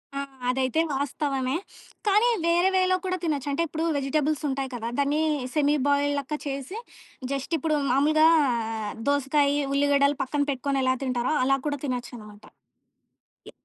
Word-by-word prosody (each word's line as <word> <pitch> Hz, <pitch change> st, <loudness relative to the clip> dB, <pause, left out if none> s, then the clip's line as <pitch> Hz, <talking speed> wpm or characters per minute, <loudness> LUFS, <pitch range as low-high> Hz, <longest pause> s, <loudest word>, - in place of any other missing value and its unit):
ఆ! -, -, -2 dB, 0.3 s
అదైతే 260 Hz, +4 st, +1 dB
వాస్తవమే. 275 Hz, -1 st, -1 dB, 0.5 s
కానీ 420 Hz, +4 st, +4 dB, 0.2 s
వేరే 345 Hz, +2 st, +3 dB
వేలో 370 Hz, 0 st, +3 dB
కూడా 370 Hz, 0 st, -1 dB
తినొచ్చు. 290 Hz, -3 st, -1 dB
అంటే 310 Hz, +4 st, 0 dB
ఇప్పుడు 320 Hz, +2 st, -3 dB
వెజిటబుల్స్ 295 Hz, +2 st, 0 dB
ఉంటాయి 270 Hz, 0 st, -2 dB
కదా! 230 Hz, -1 st, -4 dB
దాన్ని 290 Hz, +2 st, +1 dB, 0.3 s
సెమీ 295 Hz, 0 st, +3 dB
బాయిల్డ్ 285 Hz, 0 st, +2 dB
లెక్క 280 Hz, +2 st, -4 dB
చేసి 275 Hz, -, -5 dB, 0.5 s
జస్ట్ 275 Hz, +4 st, -2 dB
ఇప్పుడు 310 Hz, 0 st, 0 dB
మామూలుగా 310 Hz, +3 st, +4 dB, 0.8 s
దోసకాయ, 285 Hz, 0 st, +2 dB, 0.2 s
ఉల్లిగడ్డలు 280 Hz, 0 st, +3 dB
పక్కన 285 Hz, +2 st, -2 dB
పెట్టుకొని 275 Hz, +1 st, -1 dB
ఎలా 260 Hz, 0 st, +2 dB
తింటారో 250 Hz, +2 st, 0 dB
అలా 270 Hz, +1 st, +3 dB
కూడా 285 Hz, -1 st, -2 dB
తినొచ్చనమాట. 235 Hz, -5 st, -6 dB, 1.1 s
యాహ్! -, -, -29 dB
285 Hz, 135 wpm, -26 LUFS, 265-305 Hz, 1.1 s, కానీ